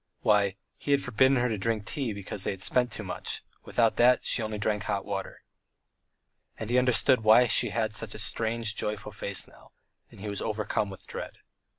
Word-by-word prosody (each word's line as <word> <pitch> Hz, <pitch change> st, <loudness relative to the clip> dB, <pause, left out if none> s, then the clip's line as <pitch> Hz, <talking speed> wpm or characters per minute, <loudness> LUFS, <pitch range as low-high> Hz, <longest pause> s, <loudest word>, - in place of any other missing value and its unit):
Why, 100 Hz, -2 st, +3 dB, 0.2 s
he -, -, -8 dB
had 140 Hz, -1 st, +3 dB
forbidden 130 Hz, +2 st, +3 dB
her 125 Hz, 0 st, +2 dB
to 110 Hz, -4 st, -2 dB
drink 110 Hz, 0 st, -1 dB
tea 135 Hz, -4 st, -2 dB
because 100 Hz, -1 st, -3 dB
they 95 Hz, -, -2 dB
spent 125 Hz, +5 st, +1 dB
too 110 Hz, -, -6 dB
much 90 Hz, -, -4 dB, 0.2 s
without 115 Hz, -2 st, +2 dB
that, 125 Hz, +1 st, +6 dB
and -, -, -21 dB
she -, -, +1 dB, 0.2 s
drank 105 Hz, -, -4 dB
only 105 Hz, -1 st, 0 dB
hot 100 Hz, -, -5 dB
water. 95 Hz, -1 st, -5 dB, 1.1 s
And 110 Hz, +1 st, -5 dB
he 125 Hz, -, +5 dB
understood 125 Hz, 0 st, +3 dB
why 110 Hz, +3 st, +7 dB
she 120 Hz, 0 st, +3 dB
had 110 Hz, 0 st, -1 dB
such 110 Hz, 0 st, -2 dB
a -, -, -6 dB
strange, 110 Hz, 0 st, 0 dB
joyful 105 Hz, 0 st, -3 dB
face 100 Hz, -1 st, -4 dB
now, -, -, -19 dB, 0.4 s
and -, -, -15 dB
he 105 Hz, -, -6 dB
was 100 Hz, -1 st, -2 dB
overcome 105 Hz, -1 st, -1 dB
with 95 Hz, -, -10 dB
dread. -, -, -7 dB
110 Hz, 200 wpm, -28 LUFS, 105-120 Hz, 1.1 s, why